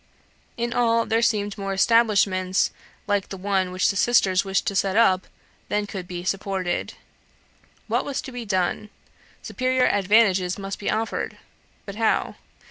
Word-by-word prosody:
In 235 0 -2
all 230 -1 +2
there 225 +1 +1
seemed 205 -3 0
more 195 0 -3
establishments 195 -3 +2 0.3
like 205 -2 -1
the 195 - -6
one 190 -1 -1
which 185 +2 +1
the - - -8
sisters 195 -4 +3
wished 195 -1 -1
to 200 - -2
set 195 0 +1
up 190 -5 +3 0.4
than 210 0 0
could 190 -3 -7
be 175 -1 -6
supported. 190 -1 -2 0.9
What - - 0
was 280 - -3
to 265 - -8
be 245 -1 -6
done? 195 +1 -1 0.5
Superior 255 0 0
advantages 195 -2 +3
must 195 -1 -6
be 205 - -3
offered. 225 +1 -2 0.5
But 200 0 -8
how? 225 -1 0
200 Hz, 150 wpm, -24 LUFS, 190-225 Hz, 0.9 s, sisters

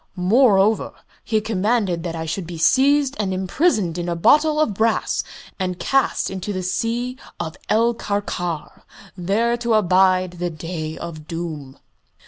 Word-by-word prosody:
Moreover, 205 +2 +3 0.3
he 220 -1 0
commanded 210 -4 0
that 165 0 -4
I 160 0 -4
should 165 +2 -4
be 170 -1 -7
seized 275 - +3
and 200 -3 0
imprisoned 190 - 0
in 175 0 -3
a 170 - -1
bottle 300 - +4
of 305 -9 +2
brass 220 +3 0 0.4
and 185 -1 -2
cast 270 -2 +1
into 190 +2 -4
the 185 -2 -3
Sea 240 +6 -2 0.2
of 160 +1 -4
El 230 +2 +3
Karkar, 190 -7 -4 0.3
there 205 +6 +1
to 235 -1 +1
abide 185 -2 +3
the 175 0 -1
Day 160 -1 -5
of 155 -3 -8
Doom." 155 -5 -6
190 Hz, 145 wpm, -21 LUFS, 175-230 Hz, 0.4 s, bottle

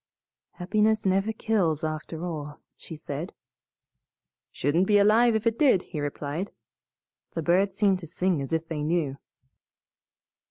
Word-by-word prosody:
"Happiness 215 +4 +1
never 195 +3 +2
kills, 195 -9 0
after 155 +2 -4
all," 150 -4 -6 0.2
she 160 - -9
said. 155 +3 -6 1.2
"Shouldn't 165 +7 +1
be 210 - +5
alive 220 +3 +5
if 220 +1 -1
it 230 0 +1
did," 255 - +4
he 155 - -6
replied. 145 +5 -3 0.9
"The 165 - -2
birds 185 +4 +2
seem 200 -2 +3
to 175 -3 -10
sing 175 -1 0
as 135 - -5
if 165 0 -1
they 160 -2 -4
knew." 150 -3 -1
175 Hz, 135 wpm, -26 LUFS, 155-205 Hz, 1.2 s, be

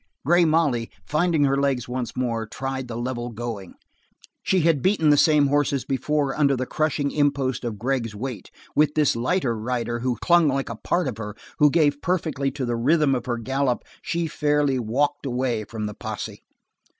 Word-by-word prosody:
Grey 175 +3 +5
Molly, 150 -8 +1 0.2
finding 160 0 +2
her 135 -1 +3
legs 140 -3 0
once 125 -1 -4
more, 115 -3 -1
tried 135 +2 -4
the 115 -1 -5
level 120 0 -3
going. 115 -5 -6 0.7
She 190 -2 +2
had 160 -4 +2
beaten 185 -6 +3
the - - +6
same 150 0 +5
horses 140 -1 +1
before 140 +1 0
under 140 -2 +3
the 130 - -2
crushing 145 0 -1
impost 140 -4 0
of 115 -3 -3
Gregg's 115 -1 -2
weight. 115 -3 -6 0.3
With 150 0 +3
this 150 -5 +3
lighter 125 +1 0
rider 120 +1 -2
who 125 -1 -1
clung 175 -2 +4
like 135 -1 -1
a 115 - -4
part 175 +8 -1
of 115 -4 -4
her, 105 -1 -6 0.2
who 150 - +6
gave 145 -2 +2
perfectly 160 -6 -1
to 135 -1 -4
the 120 -1 -1
rhythm 145 +4 +3
of 125 -2 -2
her 120 -1 -1
gallop, 130 +1 -1 0.2
she 170 0 -2
fairly 145 -3 +1
walked 140 +5 -1
away 125 -3 -1
from 110 -1 -5
the 105 - -4
posse. - - -6
135 Hz, 185 wpm, -24 LUFS, 120-150 Hz, 0.7 s, the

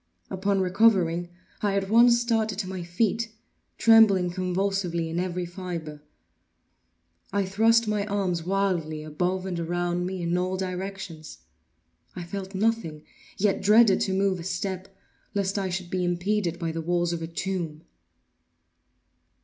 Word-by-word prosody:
Upon 195 +1 0
recovering, 180 -3 +3 0.3
I 205 -2 +1
at 195 -1 0
once 235 +1 +6
started 225 -3 0
to 195 -2 -3
my 185 -1 -5
feet, 220 +6 0 0.5
trembling 210 -6 +6
convulsively 185 -2 -1
in 170 - -1
every 180 0 -2
fibre. 170 -4 -6 1.3
I 200 -1 +1
thrust 225 +4 +3
my 210 -1 0
arms 190 -5 -1
wildly 175 -5 -1
above 180 +5 -2
and 180 -3 -3
around 175 +1 -1
me 185 -1 -4
in 170 +1 0
all 185 +1 -1
directions. 185 -3 -6 0.7
I 180 - -5
felt 190 +2 -6
nothing; 190 -7 -1 0.3
yet 200 0 +1
dreaded 210 -1 +5
to 190 - 0
move 195 -1 +1
a - - -6
step, 185 +1 -3 0.5
lest 200 0 0
I 190 -1 -2
should 180 -1 -4
be 185 -1 0
impeded 175 0 0
by 165 -2 -2
the 165 0 -4
walls 175 +1 0
of 170 - -4
a 165 - -4
tomb. 170 -2 -4
185 Hz, 140 wpm, -26 LUFS, 175-200 Hz, 1.3 s, once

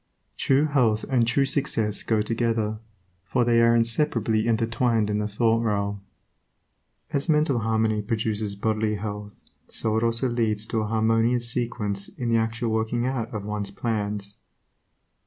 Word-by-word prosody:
True 140 +3 +2
health 125 -8 +2
and 120 -3 +3
true 135 +3 +2
success 115 -7 0
go 110 -2 +1
together, 115 -1 -1 0.4
for 120 +7 0
they 115 -1 +4
are 115 0 +5
inseparably 115 -2 +1
intertwined 115 -1 +1
in 105 - 0
the 105 - -1
thought 115 +2 +1
realm. 100 -2 -1 1.1
As 140 +4 -1
mental 150 -5 +3
harmony 110 -1 +1
produces 105 -1 -2
bodily 110 +1 0
health, 105 0 -7 0.2
so 110 -1 -1
it 110 - 0
also 115 +2 +1
leads 110 -3 0
to 110 - -1
a 105 - -2
harmonious 115 +2 +2
sequence 105 -5 -2
in 120 -2 -4
the 115 - +3
actual 115 +1 -1
working 110 +2 0
out 125 -3 -2
of 105 -3 -5
one's 105 -1 -3
plans. 105 -3 -3
110 Hz, 150 wpm, -25 LUFS, 105-120 Hz, 1.1 s, are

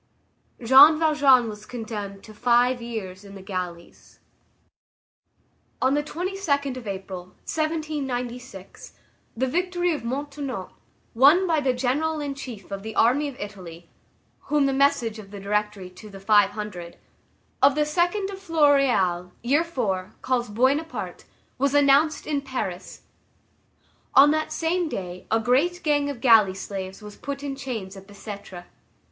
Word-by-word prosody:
Jean 280 +6 +8
Valjean 285 -6 +4
was 210 -1 -9
condemned 210 -5 -6
to 215 - -12
five 245 +2 +2
years 210 -5 -6
in 200 0 -12
the 195 - -10
galleys. 180 -3 -7 1.6
On 260 +1 +2
the 295 - +2
22d 305 -4 -2
of 250 -4 -8
April, 190 -2 -6 0.2
1796, 270 - -4 0.4
the 260 - +1
victory 355 +4 0
of 300 - -4
Montenotte, 275 -4 -5 0.4
won 290 +10 +6
by 325 -3 +2
the 270 -3 +1
general 275 +6 -1
in 285 -1 -3
chief 240 -8 -9
of 195 0 -4
the 220 +1 -7
army 270 +6 +3
of 280 - -7
Italy, 180 -5 -9 0.6
whom 295 -1 +2
the 275 - +1
message 265 -5 +1
of 200 -2 -11
the 200 0 -9
Directory 205 -2 -2
to 210 +4 -13
the 195 -1 -11
Five 205 0 +4
Hundred, 195 -5 -7 0.6
of 275 +1 +5
the 300 - +1
2d 350 +6 0
of 385 - -8
Floréal, 275 - +2
year 275 +6 +3
IV., 215 - -3
calls 245 -3 0
Buona 260 +8 +2
Parte, 320 - -7 0.3
was 280 +1 +1
announced 290 +2 +4
in 290 -2 -1
Paris; 250 -9 -5 1.1
on 285 +2 +8
that 310 0 -1
same 335 +1 -1
day 180 -6 -6
a 225 - +2
great 295 - +1
gang 290 -2 +1
of 265 -5 -6
galley 220 -6 +5
slaves 190 +1 -6
was 210 -1 -10
put 280 0 -6
in 280 -1 -4
chains 230 -8 -6
at 195 0 -12
Bicêtre. 200 -3 -9
250 Hz, 145 wpm, -24 LUFS, 205-290 Hz, 1.6 s, Jean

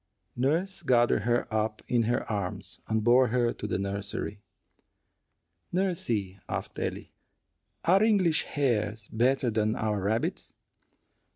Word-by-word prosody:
Nurse 165 +10 0
gathered 120 -8 +3
her 120 0 +2
up 110 0 -1
in 120 -2 +2
her 120 - 0
arms, 100 -4 -4
and 110 -1 0
bore 125 +3 +5
her 120 0 +1
to 105 - -6
the - - -1
nursery. 100 +1 -4 1.3
"Nursey," 120 - -1
asked - - -3
Ellie, - - -4 0.7
"are 185 +4 +5
English 195 -8 +3
hares 110 -6 -1
better 125 +2 +2
than 110 0 +1
our 105 -2 -1
rabbits?" 110 +4 -1
115 Hz, 120 wpm, -28 LUFS, 105-135 Hz, 1.3 s, bore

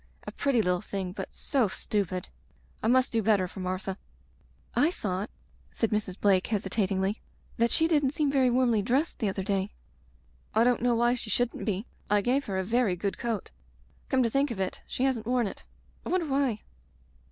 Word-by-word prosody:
A - - -5
pretty 260 -6 +1
little 180 0 +1
thing, 195 -3 -4
but 185 - -6
so 265 -6 +1
stupid. 185 -2 -2 0.5
I - - 0
must 255 +2 +4
do 230 - +1
better 205 -3 +3
for 190 - -10
Martha.'' 185 +1 -3 0.8
"I 285 +7 +4
thought/* 205 - -3 0.4
said 225 - -1
Mrs. 210 -3 -1
Blake 190 -2 +3
hesitatingly, 195 -1 0 0.4
"that 235 +1 +3
she 320 - +4
didn't 290 -4 +2
seem 295 -3 +1
very 265 -2 +4
warmly 240 -3 +3
dressed 265 +10 0
the 215 - +1
other 190 0 -3
day." 195 0 -1 0.8
"I 220 - +5
don't 245 -1 +3
know 245 -1 +3
why 240 +1 +3
she 240 -3 -3
shouldn't 245 +3 0
be. 205 0 -1 0.2
I 205 0 +4
gave 260 +6 +1
her 195 -2 -2
a 190 - 0
very 225 -1 +2
good 195 +3 -3
coat. 230 -5 -3 0.6
Come 260 -1 +3
to 230 - +2
think 275 +3 +2
of 230 -5 -5
it, 190 -1 -2
she 255 - -2
hasn't 245 -5 0
worn 245 -1 +2
it. 195 - -7 0.4
I - - -6
wonder 365 -2 +1
why 270 -6 0
225 Hz, 190 wpm, -28 LUFS, 195-250 Hz, 0.8 s, I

